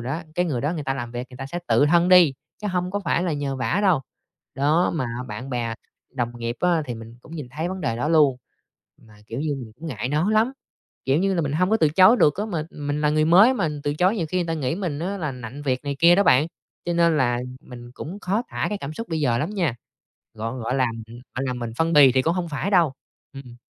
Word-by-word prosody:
đó, 135 +8 -4
cái 180 - +1
người 145 -9 -2
đó 145 +5 -1
người 155 - -4
ta 135 - -1
làm 120 -3 -5
việc 120 +1 -5
người 125 - -11
ta 135 - -6
sẽ 170 +6 -4
tự 145 - +4
thân 170 +3 +4
đi, 180 -5 +7 0.3
chứ - - -2
hông 180 -1 -1
có 205 +1 -2
phải 170 - +1
là 180 -3 -1
nhờ 140 -2 -2
vả 130 +8 0
đâu. 185 -8 +3 0.5
Đó, 150 +6 +2
mà 155 - -1 0.2
bạn 120 +6 -6
bè 120 -2 -2 0.4
đồng 120 -3 -2
nghiệp 115 +1 -3
á, 175 -3 +2
thì 120 - -4
mình 115 +1 -11
cũng 160 - -14
nhìn 150 -5 -6
thấy 155 +6 -3
vấn 190 +1 -5
đề 115 -8 -1
đó 125 +6 -1
luôn, 150 -5 +4 0.7
mà, 110 -2 -19
kiểu 115 - -5
như, 150 -1 -1
mình 120 -5 -8
cũng 165 +6 -8
ngại 125 -4 -4
nói 155 +8 +1
lắm, 220 +4 +3 0.5
kiểu 135 +2 +2
như 195 +2 +1
là, 175 - +1
mình 140 -2 -2
hông 180 +5 +1
có 220 - +4
từ 160 -8 +3
chối 185 +9 +6
được 150 -10 +4
á, 205 - -2
mà 170 -8 -2
mình 145 0 -3
là 150 -1 +2
người 155 0 +2
mới 195 +11 +6
mà 165 - 0
từ 145 0 -1
chối 185 +7 +2
nhiều 170 -6 -1
khi 185 - -1
người 175 - -1
ta 165 - -1
nghĩ 140 -3 -1
mình 175 -6 -3
á, 185 +5 -3
là 155 -6 -3
nặn 125 +3 -8
việc 130 -1 -1
này 140 -1 -3
kia 170 +2 +7
đó 200 - +4
bạn, 140 -4 +4 0.4
cho 175 - -1
nên 170 -1 +3
là 120 -4 +2 0.2
mình 120 -4 -12
cũng 170 +9 -7
khó 200 +5 0
tả - - -2
cái 210 - -3
cảm 140 -2 -6
xúc 230 +8 -7
bây 160 -2 -2
giờ 120 -5 +2
lắm 125 - -2
nha, 175 - 0 0.6
gọn 115 +3 -5
gọi 120 +2 -2
là, 130 -1 +3 0.2
ừm, 115 - -12 0.2
gọi 135 - -2
là, 130 - -1
mình 120 -2 -5
phân 165 +1 +1
bì 145 -4 +8
thì 130 +1 +2
cũng 165 +5 +1
hông 175 -2 -3
phải 155 +7 -3
đâu. 170 -7 +4 0.4
Ừm. 135 -3 -10
150 Hz, 270 wpm, -23 LUFS, 130-175 Hz, 0.7 s, bì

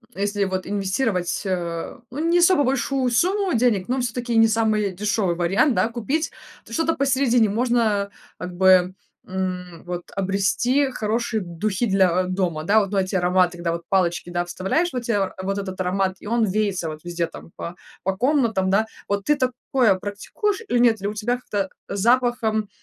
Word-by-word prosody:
если 200 +1 0
вот 185 -1 -3
инвестировать, 195 -1 -1
э, 170 -1 -3
ну, 275 - -5
не 350 +1 +4
особо 345 -4 +5
большую 265 -1 0
сумму 375 - +1
денег, 225 -6 +2
но 260 +1 +1
всё-таки 240 0 -2
не 225 - +7
самый 215 -2 +1
дешевый 200 -2 0
вариант, 195 - +2
да, 225 - +2
купить, 265 +8 -2 0.3
то - - -11
что-то 330 0 +1
посередине 260 -4 +3
можно 220 -3 +1 0.3
как 180 0 -6
бы, 185 0 +4 0.3
м, 180 -2 -4
вот 175 0 -6
обрести 200 +8 +1
хорошие 220 0 -1
духи 190 +6 -2
для, 185 -2 +3
э, - - -5
дома. 180 -4 -1
Да, 210 +6 +4
вот, 195 -2 -2
ну, 200 - +1
эти 190 +1 -2
ароматы, 180 0 +2
когда 170 -1 -2
вот 170 - -4
палочки, 175 -2 +1
да, 175 0 -1
вставляешь, 190 - 0
вот 250 - -3
те 200 -5 0
вот 195 +1 -2
этот 190 -1 -6
аромат, 190 +1 0
и - - -9
он 230 0 +2
веется 195 -4 -1
вот 155 0 -8
везде 175 -1 -2
там 165 - -12
по 170 - -6 0.3
по 190 +1 0
комнатам, 235 -7 +2
да. 205 +3 +3 0.2
Вот 200 -1 -1
ты 295 - +3
такое 250 -4 +1
практикуешь 210 - -3
или 245 - +2
нет? 225 -4 +4
Или 200 - -2
у - - -5
тебя 240 +4 0
как-то 200 -5 -3 0.2
запахом, 225 -1 +1
205 Hz, 180 wpm, -23 LUFS, 185-240 Hz, 0.3 s, не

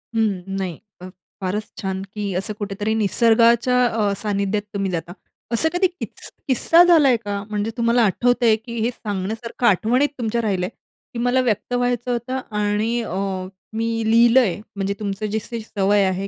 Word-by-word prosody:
हं. 215 -5 +1 0.2
नाही. 180 -4 -3 0.2
फ 185 - -8 0.3
फारच 195 +3 -1 0.2
छान, 190 -1 -3
की 205 -2 -3
असं 195 +3 -2
कुठेतरी 205 +1 -2
निसर्गाच्या 235 +3 +4
अ, 215 -4 +1
सानिध्यात 205 -1 -1
तुम्ही 195 -2 -1
जाता. 175 0 -4 0.4
असं 315 +8 +3
कधी 365 +1 +3
की 360 0 -7 0.4
किस्सा 330 +6 +5
झालाय 305 -8 +5
का? 205 -2 -4
म्हणजे 210 +1 -2
तुम्हाला 235 +1 +3
आठवतंय, 240 +2 +3
की 230 +1 -7
हे 225 +2 +1
सांगण्यासारखं 220 +3 -4
आठवणीत 235 +8 +3
तुमच्या 235 0 0
राहिलंय, 190 -4 -1 0.4
की 235 - -4
मला 245 +2 +2
व्यक्त 245 0 -1
व्हायचं 245 0 0
होतं 245 +2 -2 0.2
आणि 210 +3 0
अ, 190 -5 -4 0.6
मी 225 +1 -1 0.2
लिहिलंय. 235 -3 +5 0.2
म्हणजे 200 0 -1
तुमचं 200 0 -3
जशी 220 +2 -3
सवय 205 -2 +1
आहे 190 +1 -1
220 Hz, 155 wpm, -21 LUFS, 200-240 Hz, 0.6 s, किस्सा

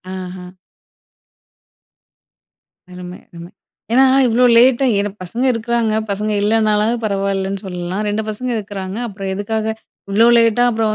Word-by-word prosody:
ஆஹா. 180 -1 -8 2.5
அருமை! 180 0 -9
அருமை! 170 0 -11 0.4
ஏன்னா, 265 +2 +6 0.2
இவ்ளோ 240 +2 +3
லேட்டா 255 +2 +5
ஏனா 205 - -1
பசங்க 230 +8 -4
இருக்கிறாங்க. 230 -1 -1 0.2
பசங்க 210 +2 -2
இல்லனாலாது 215 +1 +2
பரவால்லன்னு 195 -1 -2
சொல்லலாம். 180 +1 -4
2 210 +1 -1
பசங்க 250 +4 -4
இருக்கிறாங்க. 195 -1 -6
அப்புறம் 195 -2 -6
எதுக்காக 215 +2 -3 0.5
இவ்ளோ 220 +3 +4
லேட்டா 230 +1 +3
அப்புறம் 220 -1 0
210 Hz, 115 wpm, -17 LUFS, 190-225 Hz, 2.5 s, ஏன்னா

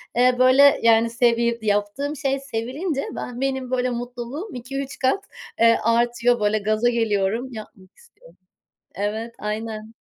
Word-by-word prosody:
eee, 250 +1 +4
böyle, 265 +2 +6
yani, 230 0 +4
sevi 235 0 +1
yaptığım 210 +8 -1
şey 275 -1 -1
sevilince 275 +5 -3
ben 245 +1 -6
benim 265 -2 -2
böyle 255 0 +1
mutluluğum 245 - -6
2-3 275 +3 -6
kat, 265 +10 +1 0.4
eee, 230 0 +5
artıyor. 240 +1 +2
Böyle 210 +1 +1
gaza 215 +3 +1
geliyorum, 225 0 0
yapmak 210 -4 -12
istiyorum. - - -20 0.7
Evet, 220 +3 -3
aynen. 215 +1 -5
240 Hz, 130 wpm, -22 LUFS, 225-265 Hz, 0.7 s, böyle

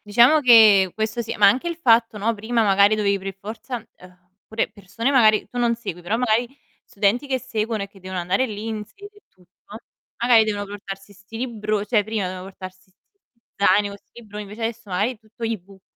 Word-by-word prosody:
Diciamo 240 +9 +4
che 215 -7 +7
questo 220 +2 -2
sì, 230 - -5
ma 205 - +5
anche 255 +12 +3
il 340 - -4
fatto, 230 -7 +3
no, 225 +3 0
prima 225 +2 -1
magari 200 +1 +4
dovevi 200 -2 +1
per 195 0 -6
forza 225 +5 -7 0.2
uhm, 180 0 -19 0.2
pure 220 +1 -2
persone 205 +6 -3
magari 220 -6 +4
tu 245 - -6
non 235 -1 +2
segui, 180 -7 -7
però 175 +6 -2
magari 240 0 +1 0.4
studenti 210 +7 0
che 265 -1 -1
seguono 225 -4 -3
e 200 - -4
che 195 0 -19
devono 185 -1 -5
andare 190 +9 0
lì 215 0 -7
in 220 -2 -4
sede 405 - -15
e 415 - -20
tutto, 185 +3 -17 0.4
magari 235 -2 +4
devono 205 -2 -2
portarsi 200 0 -9
'sti 200 +3 -13
libro 215 -4 -2
cioè 210 -1 +2
prima 215 -2 -3
dovevano 185 +1 -6
portars 185 0 -12 0.7
zaino, 200 +1 +3
con 200 - -9
'sti 240 - -17
libroni, 210 -1 -8
invece 210 +3 -10
adesso 230 -1 -4
magari 200 +6 0
è 225 - -16
tutto 220 +2 -18
e-book, 195 -4 -6
215 Hz, 205 wpm, -22 LUFS, 195-230 Hz, 0.7 s, che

